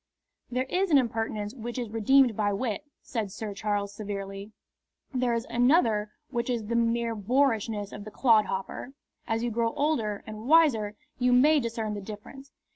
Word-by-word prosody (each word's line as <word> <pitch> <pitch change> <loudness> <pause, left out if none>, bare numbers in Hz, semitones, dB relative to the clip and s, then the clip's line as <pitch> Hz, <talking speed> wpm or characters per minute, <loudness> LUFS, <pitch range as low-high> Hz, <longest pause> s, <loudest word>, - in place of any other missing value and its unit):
"There 250 +1 0
is 375 +6 0
an 295 - +6
impertinence 225 -4 -1
which 240 -1 -6
is 240 -4 -4
redeemed 240 +2 +4
by 205 -1 +1
wit," 225 +3 -2 0.2
said 220 -5 -3
Sir 210 +1 -5
Charles, 205 0 -2
severely. 200 0 -6 0.6
"There 250 -2 +1
is 230 - -2
another 235 -4 +3 0.2
which 235 -1 -2
is 235 -3 -1
the 235 +3 -2
mere 235 0 +1
boorishness 220 -2 0
of 205 - -8
the 215 - -8
clodhopper. 215 +1 +1 0.3
As 225 0 0
you 240 - -1
grow 230 0 0
older 230 -9 0
and 215 +1 -8
wiser 265 -10 +4 0.2
you 250 0 +3
may 295 +5 +6
discern 225 -3 -3
the 205 - -5
difference." 220 +7 -10
225 Hz, 165 wpm, -28 LUFS, 210-250 Hz, 0.6 s, an